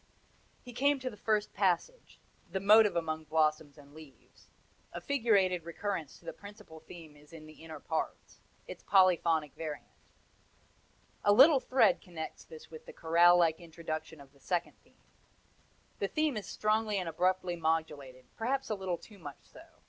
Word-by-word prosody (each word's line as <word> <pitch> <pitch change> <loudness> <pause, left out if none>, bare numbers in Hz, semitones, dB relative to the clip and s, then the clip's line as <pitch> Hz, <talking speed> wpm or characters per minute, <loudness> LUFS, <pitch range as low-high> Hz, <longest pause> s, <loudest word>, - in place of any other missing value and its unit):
He 245 - -11
came 280 +3 +2
to 255 -1 -4
the - - -11
first 210 0 -1
passage 200 - -1 0.3
the 190 - -2
motive 210 +1 +5
among 160 -2 -3
blossoms 155 -1 0
and 145 -1 -17
leaves 155 -3 -17 0.4
a - - -6
figurated 200 - +1
recurrence 170 -2 -5
to - - -23
the - - -6
principal 200 -6 -13
theme 160 -1 -13
is 150 +1 -20
in 160 -2 -12
the 155 +1 -15
inner 160 -2 -9
parts 160 +2 -5 0.3
its - - -9
polyphonic 170 -6 +3
variant. 155 -2 -6 1.4
A 205 - +4
little 270 +7 +7
thread 260 +1 +2
connects 170 -4 -8
this 160 0 -14
with 160 - -12
the - - -10
chorale 170 +2 +4
like 165 -2 +2
introduction 160 -2 -7
of 140 0 -16
the 140 - -24
second 175 +5 -2
theme. - - -29 1.0
The - - 0
theme 310 -4 -1
is 210 -4 -5
strongly 215 -1 0
and 185 -3 -3
abruptly 180 +2 0
modulated, 150 -6 -3
perhaps 265 +2 -2
a - - 0
little 190 -3 -3
too 205 +3 -16
much 145 -4 -10
so. 315 - -16
170 Hz, 165 wpm, -31 LUFS, 155-210 Hz, 1.4 s, little